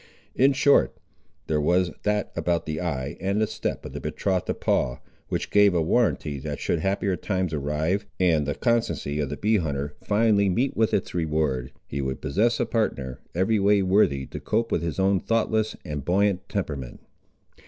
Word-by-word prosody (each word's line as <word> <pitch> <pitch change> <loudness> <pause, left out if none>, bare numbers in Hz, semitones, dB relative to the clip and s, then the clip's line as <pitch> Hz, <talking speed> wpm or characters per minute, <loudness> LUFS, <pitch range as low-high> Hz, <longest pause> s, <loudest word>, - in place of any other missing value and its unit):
In 135 +2 +4
short, 140 +1 +3 0.5
there 75 -1 0
was 90 +3 +2
that 105 -1 0
about 85 -1 0
the 80 +1 -3
eye 70 -6 -3
and 100 +3 +1
step 110 +1 -4
of - - -7
the - - -5
betrothed 95 -3 -1
of - - -2
Paul, 60 -2 0 0.3
which - - -3
gave 105 -2 +5
a 85 - +3
warranty 80 - +1
that 75 +1 -5
should 85 - 0
happier 95 +2 0
times 95 -3 -2
arrive, 80 +7 -1
and 80 -5 +3
the 75 - -1
constancy 115 -11 0
of 70 -3 -1
the 75 - -4
bee 110 +1 +2
hunter 75 -4 -2
finally 105 -2 +3
meet 125 +9 0
with 110 -1 +2
its 95 - -1
reward, 75 -7 -1
he 70 - -4
would 65 -1 -3
possess 115 - +1
a - - +2
partner 65 - -2 0.2
every 95 +5 +2
way 100 0 +4
worthy 90 -8 +3
to - - -7
cope 115 +2 -1
with - - +1
his 85 +1 -3
own 95 0 +3
thoughtless 110 0 0
and 75 -2 -4
buoyant 95 +2 +1
temperament. 70 -10 -4
90 Hz, 180 wpm, -25 LUFS, 75-105 Hz, 0.5 s, gave